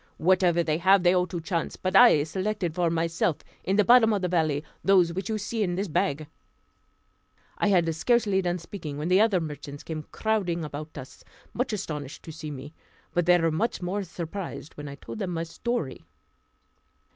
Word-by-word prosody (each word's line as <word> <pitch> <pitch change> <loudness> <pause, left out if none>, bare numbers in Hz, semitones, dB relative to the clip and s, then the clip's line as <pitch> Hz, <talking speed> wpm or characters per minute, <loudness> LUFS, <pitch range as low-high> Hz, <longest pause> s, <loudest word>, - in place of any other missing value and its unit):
Whatever 175 0 +3
they 155 -1 0
have 190 +1 +5
they 175 0 +5
owe 180 0 +2
to 175 - -4
chance; 165 +1 -2
but 185 +1 -3
I 195 -10 +7
selected 185 +1 -2
for 175 0 +1
myself, 165 -1 0 0.3
in 190 - 0
the 210 - +5
bottom 235 -1 +6
of 200 -2 -1
the - - +2
valley, 155 -5 +1 0.2
those 180 -4 +4
which 190 +3 -4
you 220 - 0
see 215 +2 -3
in 180 -4 0
this 195 +3 -2
bag," 150 -1 0 1.3
I - - +2
had 175 -5 +3
scarcely 205 +2 +2
done 175 -1 -1
speaking, 165 -4 -7
when 155 +3 -3
the 185 +3 +5
other 215 -4 +3
merchants 145 -2 -7
came 155 -2 -6
crowding 190 -7 -1
about 150 +1 -7
us, 130 -1 -10 0.3
much 250 +1 -1
astonished 150 -9 -5
to 160 - -8
see 155 -1 -7
me; 145 +1 -8 0.4
but 175 -1 +1
they 180 0 +7
were 165 -1 +2
much 215 +10 -1
more 190 +3 -1
surprised 175 -2 -6
when 145 0 -8
I 140 - -7
told 215 - -9
them 195 -4 -2
my 165 -2 -2
story. 170 - -3
175 Hz, 190 wpm, -26 LUFS, 155-195 Hz, 1.3 s, I